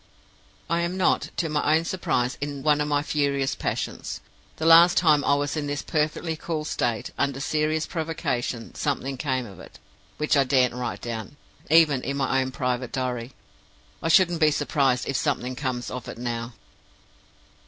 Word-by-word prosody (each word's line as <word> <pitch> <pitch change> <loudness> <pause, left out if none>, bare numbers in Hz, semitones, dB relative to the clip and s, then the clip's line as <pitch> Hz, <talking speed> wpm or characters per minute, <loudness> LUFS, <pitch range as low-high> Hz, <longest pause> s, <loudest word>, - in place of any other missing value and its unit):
"I 170 +1 +1
am 170 +2 -2
not, 185 - +2
to 170 - 0
my 150 0 +2
own 165 - -3
surprise, 130 -9 -1
in 145 -1 -4
one 150 -1 +3
of 150 - 0
my 145 -1 +1
furious 140 -2 0
passions. - - -4 0.4
The 160 - -4
last 170 +3 +7
time 155 -4 +4
I 140 - +3
was 145 +1 -1
in 150 -2 -2
this 145 0 -3
perfectly 155 +1 -1
cool 155 -1 -4
state, 120 -7 -2
under 140 -1 0
serious 155 +2 0
provocation, 130 -8 -3
something 135 -2 -2
came 130 -2 -2
of 95 -4 -12
it, - - -13 0.4
which 150 0 +1
I 140 - +5
daren't 130 -2 +2
write 125 0 -4
down, 115 +3 -6 0.3
even 155 -4 +5
in 140 +2 -3
my 135 -1 +1
own 130 - -2
private 125 -1 -2
diary. 125 -1 -3 0.7
I - - -2
shouldn't 175 0 +4
be 155 - +6
surprised 135 -3 +1
if 135 - 0
something 125 +1 -1
comes 125 -2 -3
of 125 -2 -6
it - - -8
now. 120 0 -4
140 Hz, 175 wpm, -25 LUFS, 125-155 Hz, 0.7 s, last